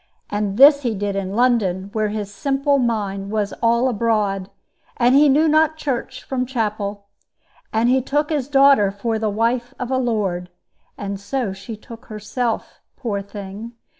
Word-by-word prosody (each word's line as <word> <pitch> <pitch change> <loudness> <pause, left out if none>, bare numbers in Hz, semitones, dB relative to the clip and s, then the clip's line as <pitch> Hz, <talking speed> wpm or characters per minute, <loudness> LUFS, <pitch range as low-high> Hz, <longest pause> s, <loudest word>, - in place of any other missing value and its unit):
And 205 -1 -1
this 280 +2 +8
he 235 -5 -1
did 200 0 -2
in 195 0 -3
London, 200 -6 +1
where 215 -1 +1
his 205 -1 -4
simple 275 +6 +1
mind 200 -5 -1
was 210 -1 -1
all 235 +2 +3
abroad, 210 -5 0 0.5
and 245 +1 +4
he 290 +2 +6
knew 300 +4 +4
not 315 0 +3
church 260 -3 -3
from 260 -2 -2
chapel. 210 -4 -3 0.7
He 240 +4 +3
took 295 +4 -1
his 285 -5 -1
daughter 275 -7 +5
for 220 +3 -2
the 215 -1 0
wife 235 +4 -1
of 250 0 -4
a 260 - +2
lord, 200 -8 -1 0.5
and 200 -1 -4
so 215 0 -2
she 210 +3 -8
took 230 +3 -12
herself, 220 +3 -3 0.2
poor 210 -6 -2
thing! 200 +3 -8
225 Hz, 160 wpm, -21 LUFS, 200-260 Hz, 0.7 s, this